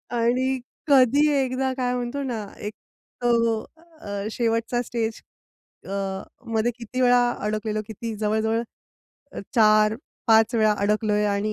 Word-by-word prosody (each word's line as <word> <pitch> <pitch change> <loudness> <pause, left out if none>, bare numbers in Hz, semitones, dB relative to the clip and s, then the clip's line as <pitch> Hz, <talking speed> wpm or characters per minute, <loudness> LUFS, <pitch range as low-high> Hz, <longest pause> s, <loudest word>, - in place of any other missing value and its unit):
आणि 255 +3 +1 0.3
कधी 280 +1 +5 0.2
एकदा 260 0 -1
काय 250 -1 0
म्हणतो 250 +3 -3
ना 235 -5 -3 0.2
एक 210 +1 -5 0.5
तो 230 -2 +2 0.4
अ, 200 0 -4
शेवटचा 230 +1 0
स्टेज 230 -2 -3 0.6
अ, 195 - -6 0.6
मध्ये 225 +2 +2
किती 250 +2 -4
वेळा 245 0 +5 0.2
अडकलेलो, 215 +1 -2
किती 225 +1 -5
जवळ-जवळ 220 +2 0 0.9
4-5 220 +1 +3
वेळा 215 -2 +4
अडकलोय 210 +1 +1
आणि 205 +1 0
225 Hz, 115 wpm, -24 LUFS, 215-245 Hz, 0.9 s, कधी